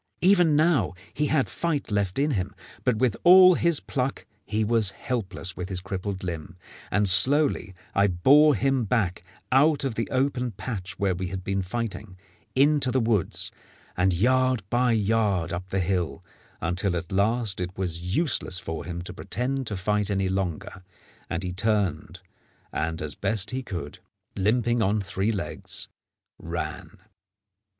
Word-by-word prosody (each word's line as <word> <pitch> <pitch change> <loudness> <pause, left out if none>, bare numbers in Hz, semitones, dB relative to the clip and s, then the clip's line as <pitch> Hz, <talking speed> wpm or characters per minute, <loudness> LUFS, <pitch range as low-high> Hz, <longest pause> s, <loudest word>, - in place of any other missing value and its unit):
Even 175 -4 +5
now 155 - +2 0.2
he 150 - 0
had 145 -2 +2
fight 155 -8 -2
left 100 -3 0
in 145 +2 +2
him; 95 -8 -2 0.3
but 125 - +2
with 120 -1 +1
all 185 +1 +9
his 170 -2 +3
pluck 130 0 -3 0.2
he 110 +1 0
was 110 -2 +2
helpless 95 -7 -3
with 90 +1 -5
his 95 -2 -1
crippled 95 0 -5
limb, 85 -2 -6 0.3
and 105 +1 +2
slowly 130 0 +4 0.2
I 100 +1 +3
bore 140 - +5
him 135 +1 +1
back 105 -5 0 0.3
out 145 +3 +4
of 135 -4 -1
the 115 +1 -3
open 130 -2 0
patch 100 -2 -6
where 100 -2 +1
we 95 +1 -4
had 95 0 -5
been 95 +1 -1
fighting 105 -1 -5 0.4
into 140 0 +4
the 130 - +1
woods, 110 -6 0 0.4
and 95 +1 +2
yard 130 +4 +2
by 120 0 +3
yard 105 -5 +1
up 90 +2 -5
the 95 - -1
hill, 90 -4 -1 0.4
until 90 +3 -1
at 85 -1 -5
last 105 0 +1
it 90 +1 -5
was 90 0 -2
useless 140 - 0
for 80 -3 -5
him 85 -1 -5
to 90 - -7
pretend 130 +6 -2
to 100 - -3
fight 105 +2 0
any 95 -2 0
longer, 95 0 -3 0.5
and 85 +3 -2
he 90 -1 -3
turned 105 0 -1 0.5
and, 80 +1 -2
as 75 -1 -4
best 100 0 0
he 130 +1 -2
could, 85 - -7 0.4
limping 120 +4 +1
on 105 0 +2
three 100 +2 -1
legs, 100 -5 -4 0.5
ran. - - -6
105 Hz, 160 wpm, -26 LUFS, 95-130 Hz, 0.5 s, all